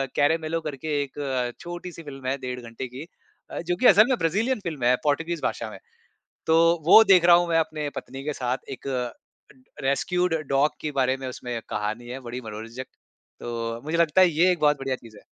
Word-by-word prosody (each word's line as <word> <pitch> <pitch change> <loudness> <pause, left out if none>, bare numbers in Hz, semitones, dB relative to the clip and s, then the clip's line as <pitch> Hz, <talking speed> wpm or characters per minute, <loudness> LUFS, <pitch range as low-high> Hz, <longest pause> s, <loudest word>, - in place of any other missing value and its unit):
"Caramelo" 160 +2 +1
करके 150 0 -3
एक 130 -3 -3
छोटी-सी 175 -1 -8
फ़िल्म 135 -3 -8
है, 135 +2 0
डेढ़ 125 -1 -5
घंटे 115 +2 -7
की। 130 +5 -9 0.5
अ, - - -4
जो 175 +1 -1
कि 220 - -2
असल 215 +3 +7
में 260 - +2
ब्राज़ीलियन 210 +9 +1
फ़िल्म 155 -7 -5
है, 125 +1 +5
पोर्तुगीज़ 165 +3 0
भाषा - - -2
में। - - -10 0.7
तो 160 0 +5 0.3
वो 220 +6 +9
देख 185 -4 +5
रहा 175 0 +8
हूँ 175 0 +2
मैं 165 -1 +3
अपने 155 -2 -2
पत्नी 135 +1 -7
के 150 +1 -2
साथ। 125 -1 -3
एक 135 0 -7
अ, 125 -2 -2 0.7
रेस्क्यूड 180 +6 +1
ड 160 - -2
डॉग 140 +2 +3
के 155 - -3
बारे 130 -1 +1
में 135 -1 -6
उसमें 125 -1 -6
एक 115 - -7
कहानी 110 +3 -3
है, 125 +2 -6
बड़ी 125 0 -7
मनोरंजक। 115 +3 -7 0.5
तो 115 0 -4
मुझे 155 +3 -2
लगता 170 +1 +4
है 185 - +7
ये 170 +3 +3
एक 175 - -1
बहुत 150 -1 +3
बढ़िया 135 -1 -2
चीज़ 115 -4 -15
है। - - -17
145 Hz, 210 wpm, -25 LUFS, 125-165 Hz, 0.7 s, वो